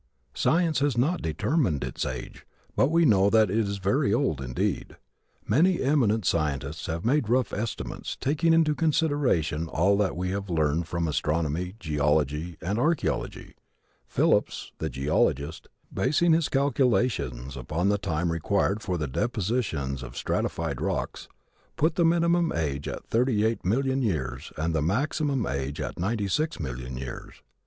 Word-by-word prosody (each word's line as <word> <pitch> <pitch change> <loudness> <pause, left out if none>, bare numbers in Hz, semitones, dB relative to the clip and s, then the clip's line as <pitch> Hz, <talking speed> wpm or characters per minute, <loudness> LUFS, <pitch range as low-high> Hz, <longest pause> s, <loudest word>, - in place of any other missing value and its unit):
Science 165 -4 +2
has 140 -4 +1
not 150 +9 +1
determined 80 - 0
its - - -3
age 65 -1 -7 0.3
but 135 - +3
we 165 +1 +4
know 100 -6 +5
that 110 -3 +4
it 105 - 0
is 100 -2 -1
very 100 +7 +1
old, 115 - +1
indeed. 65 -2 -2 0.5
Many 175 +5 +3
eminent 115 - +2
scientists 75 -1 -1
have 85 +3 -3
made 130 -2 +2
rough 125 -1 +1
estimates, 110 +2 -4
taking 155 +4 +1
into 165 -2 +4
consideration 140 - +1
all 90 +6 +2
that 100 -4 0
we 90 +1 -2
have 100 0 -4
learned 80 0 +1
from 85 -1 -1
astronomy, 80 +4 -1
geology 75 0 0
and 100 +5 -1
archeology. 160 +5 -1 0.5
Phillips, - - +1
the 80 - -2
geologist, 70 +3 0 0.3
basing 160 +6 +3
his 165 -2 +2
calculations 120 - 0
upon 75 +9 -1
the 100 0 +1
time 85 -3 -1
required 100 +5 0
for 90 -4 -2
the 75 -3 -2
depositions 90 - -1
of - - -8
the - - -11
stratified - - -2
rocks, - - -3 0.5
put 160 +3 +2
the 175 - +1
minimum 170 0 +3
age 75 -3 -2
at - - -6
thirty 115 -2 +1
eight 115 +1 0
million 130 +7 +1
years 70 - -2
and 80 +2 -1
the 80 - +1
maximum 135 - 0
age 70 +1 -3
at - - -4
ninety 100 +3 -1
six 155 - -1
million 65 -3 -5
years. 65 -1 -8
100 Hz, 150 wpm, -27 LUFS, -, 0.5 s, know